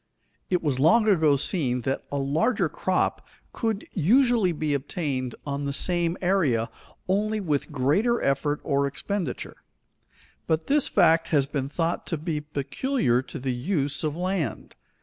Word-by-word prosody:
It 180 -2 0
was 140 -4 0
long 215 - +4
ago 160 -8 +4
seen 135 -4 +1
that 135 +3 -2
a 140 - -1
larger 160 - +1
crop 185 +3 -1 0.3
could 225 -3 -2
usually 230 - +3
be 155 -2 -2
obtained 135 -3 -3
on 140 0 -3
the 140 - -2
same 175 +2 +2
area, 140 -12 +1 0.4
only 210 +3 0
with 155 -6 -2
greater 155 - +1
effort 145 +2 0
or 140 -1 +1
expenditure; 185 +7 -4 0.9
but 160 0 0
this 290 0 +2
fact 165 -1 +3
has 145 -4 +2
been 140 -1 -3
thought 165 +2 -2
to 165 - -2
be 155 -1 -3
peculiar 150 - -1
to 130 - -8
the 130 -1 -2
use 145 +2 -1
of 155 0 -2
land. 180 - -3
155 Hz, 150 wpm, -25 LUFS, 140-185 Hz, 0.9 s, long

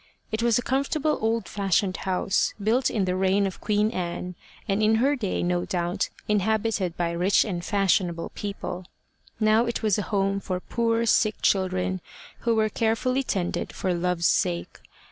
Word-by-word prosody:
It 220 +1 -1
was 235 -1 +3
a 245 - -1
comfortable 280 +4 0
old 225 +1 0
fashioned 195 -2 0
house, 190 +1 0
built 230 +5 +2
in 205 -4 0
the 180 0 0
reign 190 +2 +2
of 190 - -5
Queen 210 0 +1
Anne, 180 -2 -4 0.3
and 200 +1 +1
in 215 +1 +4
her 270 +6 +3
day, 215 -8 -2
no 175 0 0
doubt, 175 +2 -1 0.2
inhabited 210 -3 0
by 170 -1 0
rich 180 +4 +3
and 175 -5 -3
fashionable 180 -4 +1
people: 185 -3 -5 0.5
now 220 +2 +3
it 235 - -3
was 210 -2 +2
a 205 - -4
home 195 -1 +1
for 185 -2 -3
poor 230 +3 0
sick 215 -1 +2
children, 185 -1 +1 0.4
who 235 -1 +1
were 220 -1 +3
carefully 230 +5 0
tended 190 -9 -2
for 185 - -1
love's 175 0 0
sake. 85 - 0
200 Hz, 165 wpm, -25 LUFS, 180-225 Hz, 0.5 s, in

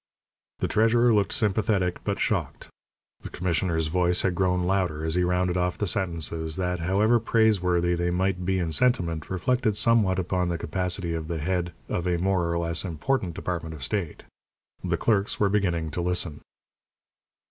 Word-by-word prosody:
The - - +1
treasurer 115 +2 +3
looked 105 -2 +2
sympathetic 100 -4 +1
but - - -1
shocked. - - -2 0.5
The - - -8
commissioner's 85 -2 -1
voice 90 +2 +1
had 95 - +1
grown 90 -1 +1
louder 90 -4 0
as 80 - -1
he 90 +1 +2
rounded 90 0 +1
off 90 0 0
the 105 - -1
sentences 85 -3 -1
that, 90 -1 -2
however 100 +7 +2
praiseworthy 90 -6 +2
they 85 0 0
might 90 +1 0
be 95 +1 0
in 85 -3 -1
sentiment, 85 -6 +1
reflected 110 +3 0
somewhat 105 -4 +3
upon 90 -1 -1
the 85 - -1
capacity 90 +1 -2
of 80 -1 -4
the 85 -1 -3
head 85 +2 -1 0.2
of 90 +1 -2
a 90 -1 +1
more 90 -1 0
or 85 - 0
less 85 -1 -1
important 90 - -2
department 80 -3 -4
of 70 - -9
state. 95 0 -3 0.6
The - - 0
clerks 105 -3 0
were 100 - +3
beginning 85 -6 0
to 85 - -2
listen. 90 -3 -1
90 Hz, 170 wpm, -26 LUFS, 85-95 Hz, 0.6 s, treasurer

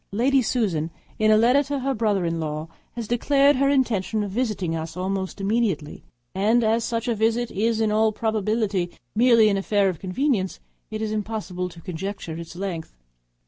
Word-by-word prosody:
Lady 260 +6 +3
Susan, 200 -10 0 0.3
in 215 0 +4
a 215 - +6
letter 245 +5 +5
to 285 0 -3
her 270 +1 -1
brother 210 -6 +1
in 165 0 -1
law, 155 0 -3 0.3
has 235 -3 -4
declared 275 +4 +3
her 275 +1 +3
intention 220 -6 +1
of 200 - -4
visiting 210 -7 -1
us 160 +1 -5
almost 190 +1 -3
immediately; 195 -7 -1 0.3
and 220 +5 +2
as 225 +1 +2
such 230 +1 -2
a 240 - +2
visit 225 +2 0
is 225 +3 0
in 220 -1 +2
all 220 +1 +3
probability 215 -4 0 0.2
merely 230 -1 +5
an 200 -2 +2
affair 200 0 +2
of 175 -4 -5
convenience, 195 0 -1 0.3
it 215 0 -4
is 215 - -2
impossible 210 -4 -3
to 170 -1 -13
conjecture 180 -1 -5
its 170 0 -9
length. 175 - -5
215 Hz, 180 wpm, -24 LUFS, 185-235 Hz, 0.3 s, a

